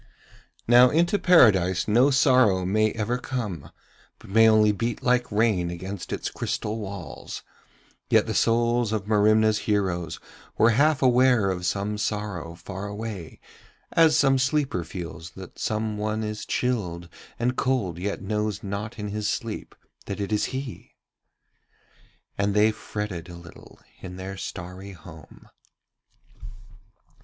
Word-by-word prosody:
Now 120 +2 +7
into 170 +7 +2
Paradise 95 - +4
no 120 +6 +4
sorrow 130 -9 +4
may 110 +3 +2
ever 115 +3 -2
come, 105 - -5 0.5
but - - -14
may 115 +2 +6
only 110 -1 +5
beat 115 +2 -3
like 125 -1 +1
rain 105 -5 +1
against 95 +2 -6
its - - -3
crystal 110 +2 -3
walls, 95 -9 -7 0.7
yet - - +4
the - - -3
souls 120 0 +2
of 105 -3 -2
Merimna's 110 0 +3
heroes 90 -5 -1 0.4
were 115 +2 +5
half 145 +4 +3
aware 125 -5 +4
of 90 -1 -3
some 100 +3 -2
sorrow 105 -6 -3
far 95 +3 -7
away 105 -5 -7 0.5
as 160 -2 +5
some 135 -1 +4
sleeper 130 - 0
feels 85 -1 -7
that - - -11
some 110 -1 -2
one 110 +1 -2
is 105 0 -5
chilled 90 -9 -2 0.3
and 125 +2 0
cold 110 -12 -1
yet 100 +1 -3
knows 105 +1 -2
not 100 +3 -5
in 105 -1 -4
his 105 0 -2
sleep 115 -1 -4 0.3
that 100 - -4
it 100 +1 -3
is 105 - +1
he. 130 -2 -7 1.4
And 100 0 +1
they 105 +1 +5
fretted 105 -5 -6
a 85 - -9
little 85 0 -14 0.2
in 90 -1 -8
their 95 +1 -6
starry 95 +1 -7
home. 80 -2 -14
105 Hz, 135 wpm, -25 LUFS, 95-115 Hz, 1.4 s, Now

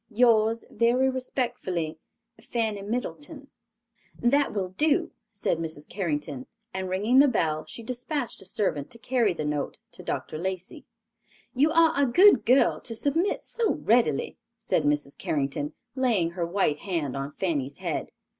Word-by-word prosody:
"Yours 225 -1 +3
very 245 +3 +3
respectfully, 210 - -3 0.4
"FANNY 220 -4 -2
MIDDLETON." 275 +7 -5 0.7
"That 280 +4 +2
will 190 -3 -2
do," 295 +11 +1 0.2
said 165 - -1
Mrs. 155 -2 -4
Carrington; 150 -8 -3 0.3
and 190 0 -3
ringing 210 +8 +3
the 285 - +7
bell, 160 - 0
she 230 - -8
dispatched 250 +3 -4
a - - -12
servant 170 -8 -1
to - - -10
carry 235 -2 +1
the 160 -3 -4
note 150 -1 -2
to - - -11
Dr. 155 - -4
Lacey. 185 0 -5 0.7
"You 290 +5 +3
are 330 0 +5
a 280 -1 +3
good 360 - +6
girl 255 +3 +4
to 230 - -3
submit 320 - 0
so 465 -2 0
readily," 230 - +1 0.2
said - - 0
Mrs. 145 -1 0
Carrington, 145 0 -2 0.2
laying 230 -11 +1
her 170 -1 -2
white 170 -5 +1
hand 165 -9 -2
on 140 +1 -4
Fanny's 145 -6 -2
head. - - -3
210 Hz, 145 wpm, -27 LUFS, 160-255 Hz, 0.7 s, the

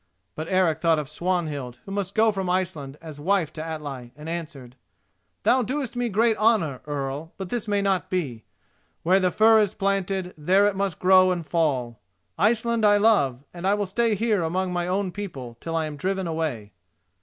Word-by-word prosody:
But 155 +1 -5
Eric 175 -5 +2
thought 165 -2 +3
of 150 -2 -3
Swanhild, 150 -6 -2
who 195 - -8
must 200 -1 -3
go 220 0 +4
from 190 -3 -3
Iceland 170 -7 -2
as 155 -3 -9
wife 175 -1 +1
to 155 - -5
Atli, 145 -6 -6
and 150 +2 -10
answered: 150 -7 -6 0.7
"Thou 255 - +4
doest 255 +1 -3
me 245 -1 -1
great 225 +2 +3
honour, 205 - +2
Earl, 145 +2 -4
but 190 -2 -6
this 235 -1 -3
may 205 -1 +1
not 195 -2 0
be. 135 -12 -2 0.6
Where 185 +3 +4
the 185 -1 +2
fir 220 +4 +5
is 210 -1 +1
planted, 195 -2 -1
there 185 +7 +3
it 205 -1 +1
must 195 -4 -1
grow 185 0 +5
and 175 -3 -2
fall. 135 -9 0 0.4
Iceland 230 +1 +1
I 205 -1 +6
love, 145 - +3
and 175 +1 -4
I 200 - +4
will 205 0 -1
stay 225 +3 +1
here 215 -2 +1
among 180 +3 -1
my 175 0 -1
own 190 +1 -1
people 140 -13 -7
till 165 0 -4
I 160 -1 +1
am 150 -1 -6
driven 190 +4 -1
away." 155 -11 -3
180 Hz, 190 wpm, -25 LUFS, 155-200 Hz, 0.7 s, I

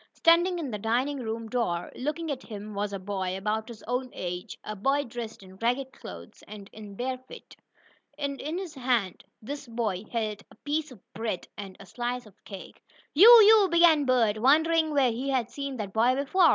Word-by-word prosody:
Standing 345 +2 +4
in 300 -7 -4
the 210 - -4
dining 250 +7 0
room 225 -1 -4
door, 210 -8 -2
looking 305 +4 -3
at 265 -2 -4
him, 210 -3 -8
was 205 0 -2
a 200 - -3
boy, 190 -1 -3
about 215 +2 -2
his 235 -3 -11
own 250 +2 -2
age 180 0 -5
a 215 - -5
boy 275 +8 +1
dressed 235 -4 -7
in 190 0 -14
ragged 250 +4 -1
clothes, - - -11
and 205 -2 -11
in 210 -2 -10
bare 255 +3 -3
feet, 255 - -13 0.6
and 280 -2 -3
in 310 +4 -3
his 370 -4 -6
hand 245 - -1 0.2
this 285 +3 -6
boy 220 -5 -2
held 215 -3 -2
a - - -18
piece 300 +6 -2
of 250 - -12 0.2
bread, 220 -5 -4
and 195 -2 -8
a 200 - -11
slice 245 +5 -4
of 210 - -16
cake. 195 -2 -10 0.3
"You 390 +10 +9
you!" 425 -1 +7
began 335 -4 +5
Bert, 230 -5 +2
wondering 315 +5 +4
where 275 -4 +3
he 255 +5 -3
had 250 -3 0
seen 275 0 -5
that 200 -3 -5
boy 240 +3 +3
before. 320 +6 +3
245 Hz, 195 wpm, -27 LUFS, 210-285 Hz, 0.6 s, You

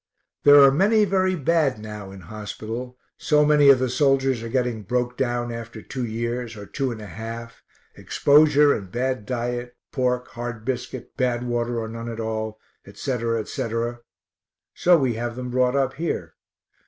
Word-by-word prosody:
There 145 0 +9
are 135 - +7
many 210 +8 +4
very 185 -1 +1
bad 155 -4 +1
now 105 -2 -8
in 95 0 -11
hospital, 110 +6 -7 0.2
so 150 -1 +3
many 145 -1 +5
of 135 - +8
the 130 +1 0
soldiers 135 -1 +2
are 115 - -5
getting 125 -3 -1
broke 120 +4 -1
down 120 -2 -1
after 115 -1 -7
two 130 +3 -5
years, 115 0 -3
or 100 - -8
two 130 +6 -2
and 115 - -6
a 105 - -8
half, 115 +2 -8 0.3
exposure 150 0 +4
and 95 -3 -6
bad 125 -3 -2
diet, 120 0 -3 0.2
pork, 125 -1 -1
hard 120 -2 -6
biscuit, 125 -1 -5
bad 125 -1 0
water 120 -1 -1
or 110 - -4
none 115 +1 -6
at 115 -1 -6
all, 110 -1 -3 0.3
etc., 115 +2 -2
etc. 115 +2 -3 0.7
so 175 -1 +4
we 130 -5 +1
have 120 +1 -4
them 125 0 -5
brought 125 +1 +2
up 135 -1 +1
here. 165 +5 -3
120 Hz, 165 wpm, -24 LUFS, 115-135 Hz, 0.7 s, There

